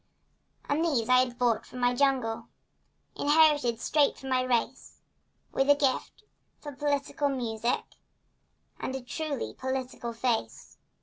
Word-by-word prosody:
And 300 +3 +1
these 275 -9 +1
I 255 0 +6
had 250 -1 0
brought 235 -3 +1
from 250 - -9
the 245 0 +3
jungle— 250 -4 0 0.7
Inherited 290 -6 +3
straight 290 +3 +2
from 265 - -8
my 255 -1 +2
race— 255 0 -2 0.5
With 270 +1 +1
a 285 - +8
gift 280 +8 -1 0.4
for 295 - -8
political 285 0 -1
music 235 -3 -1 1.0
And 260 - -3
a 265 - -4
truly 295 +1 -4
political 260 -2 -4
face. 230 -1 -3
260 Hz, 130 wpm, -28 LUFS, 245-285 Hz, 1.0 s, a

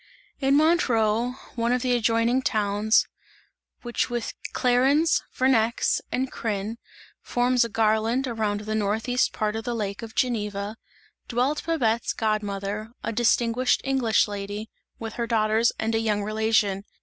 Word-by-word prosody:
In 275 0 +3
Montreux, 245 -7 +2 0.2
one 235 -1 0
of 250 -1 +1
the 250 -1 +2
adjoining 230 +2 +2
towns, 210 -1 +2 0.8
which 240 -1 -1
with 240 -1 -3 0.2
Clarens, 270 +6 +3
Vernex 235 -3 +2
and 260 +1 -1
Crin 215 0 -3 0.4
forms 245 0 +2
a 235 - -3
garland 225 +4 +1
around 215 -3 -1
the 215 +1 -4
northeast 220 +4 0
part 215 0 -2
of 225 - -3
the 240 +1 -3
lake 205 -2 -3
of 225 -1 -9
Geneva, 210 -4 -1 0.5
dwelt 255 +5 0
Babette's 235 -9 +1
god 215 -1 0
mother, 205 +1 -4
a 230 - -2
distinguished 240 +2 +2
English 260 -6 +2
lady, 205 +1 -6 0.3
with 225 -1 -6
her 235 -1 -3
daughters 220 +1 +2
and 225 +1 -1
a 225 - +2
young 210 -2 0
relation. 215 -2 +1
225 Hz, 140 wpm, -25 LUFS, 215-245 Hz, 0.8 s, In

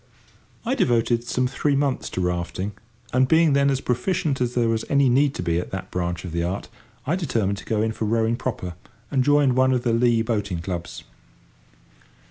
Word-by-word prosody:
I 245 - +1
devoted 120 - +1
some 125 +1 0
three 140 +3 0
months 140 -2 0
to 95 - -3
rafting, 90 +2 -2 0.4
and, 130 +1 +4
being 160 0 +4
then 140 0 +3
as 135 -1 0
proficient 135 +2 -1
as 125 0 -1
there 120 -2 +2
was 115 0 0
any 140 -2 +4
need 140 +3 +3
to - - -3
be 85 -1 +1
at - - -5
that 95 - -6
branch 90 0 -2
of 85 - -6
the 85 +1 -1
art, 90 +4 -3 0.4
I 150 +6 +1
determined 110 - -1
to - - -12
go 110 -1 0
in 110 - 0
for 110 - -3
rowing 115 +1 +1
proper, 100 -8 -4 0.4
and 135 -3 +2
joined 145 -2 +4
one 130 0 +4
of 125 -1 0
the 120 - +1
Lea 115 -1 +3
boating 105 -5 -1
clubs. 85 -1 -5
120 Hz, 200 wpm, -23 LUFS, 100-135 Hz, 0.4 s, and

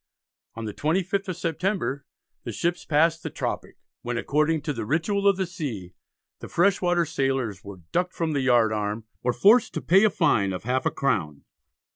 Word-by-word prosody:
On 115 0 -5
the 105 - -5
25th 185 - -1
of 185 -2 -4
September 165 - -2 0.4
the - - -5
ships 170 0 -2
passed 165 +2 +2
the - - -4
"tropick," - - -4 0.2
when 120 0 -3
according 150 +4 +1
to 150 -1 -2
the 115 - -4
ritual 185 - 0
of 200 -2 +4
the 190 - 0
sea, 130 - -6 0.5
the - - -9
fresh 190 +3 +2
water 175 -1 +2
sailors 135 - -2
were 100 -3 -10
ducked 180 +1 -1
from 165 -2 -1
the 140 - 0
yard 120 -4 +3
arm, 105 +1 -3 0.2
or 125 - +1
forced 220 - +4
to - - -2
pay 190 +4 +5
a 215 - +6
fine 100 - +2
of 90 - -6
half 125 +3 0
a - - 0
crown. 80 - -1
150 Hz, 190 wpm, -25 LUFS, 115-180 Hz, 0.5 s, a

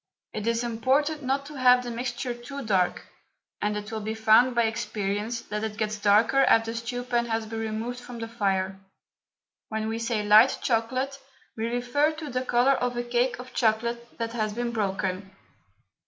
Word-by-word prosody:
It 215 +1 -4
is 230 +1 +1
important 265 +7 +1
not 275 +1 -1
to 300 - -10
have 250 -1 +6
the 240 - -5
mixture 245 +1 -3
too 260 +3 -8
dark, 190 -4 +1 0.6
and 210 0 0
it 210 +1 -6
will 220 - -3
be 220 +1 -3
found 225 +3 +5
by 235 - +4
experience 220 0 -2
that 210 -1 -5
it 215 -1 -4
gets 215 0 -2
darker 215 +6 +4
after 225 -2 +3
the 230 - -5
stew 245 +1 -4
pan 240 -1 0
has 225 -1 -1
been 225 +1 -5
removed 225 +3 -3
from 245 -1 -9
the 225 0 -5
fire. 195 -4 -1 0.9
When 220 0 -2
we 225 +1 -2
say 230 -2 -1
light 215 +5 +6
chocolate 255 +4 0 0.4
we 225 0 -2
refer 245 +6 +1
to 310 -2 -7
the 255 +1 -1
colour 250 +1 +3
of 245 -2 -1
a 240 - -1
cake 240 +1 0
of 250 +1 -10
chocolate 235 +1 0
that 230 0 -3
has 215 -3 -1
been 240 +1 -2
broken. 195 -3 -2
230 Hz, 185 wpm, -26 LUFS, 215-245 Hz, 0.9 s, have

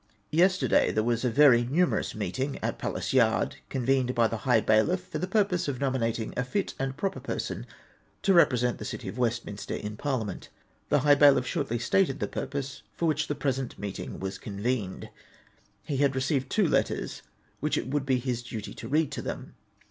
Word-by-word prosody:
Yesterday 175 -5 +3
there 110 - +1
was 120 +1 0
a 125 - +2
very 120 -1 +6
numerous 165 +9 +1
meeting 110 +8 -2
at - - -2
Palace - - -3
Yard, - - +2
convened 130 0 +1
by 115 -1 +4
the 115 - -3
high 120 - +6
bailiff, 110 - +2
for - - -5
the 185 - -2
purpose 190 -4 +1
of 140 -3 -2
nomi 130 0 0
nating 115 -1 -2
a 125 - 0
fit 190 +11 -2
and 135 0 -2
proper 195 +4 -2
person - - -4 0.6
to 195 - +4
represent 125 -8 +3
the - - -5
City - - -6
of 125 - -6
Westminster 115 -4 -2
in 105 0 -5
Parliament. 130 -7 -3 0.4
The - - +3
high 145 -1 +6
bailiff 145 -3 +6
shortly 135 -6 -1
stated 135 +5 +1
the - - -1
purpose 140 -1 -4
for 170 - 0
wliich 150 0 -2
the 145 - -2
present 135 -3 -2
meeting 100 -1 -6
was 95 0 -4
convened. 105 -1 -3 0.7
He 140 - -3
had 140 -1 +2
received 130 0 0
two 210 -5 +2
letters, - - 0 0.4
which - - 0
it - - -2
would 135 0 -1
be 130 -2 +3
his 125 -1 -2
duty 115 -3 -7
to - - -8
read 155 +1 +1
to - - -4
them. - - -6
130 Hz, 190 wpm, -28 LUFS, 120-145 Hz, 0.7 s, very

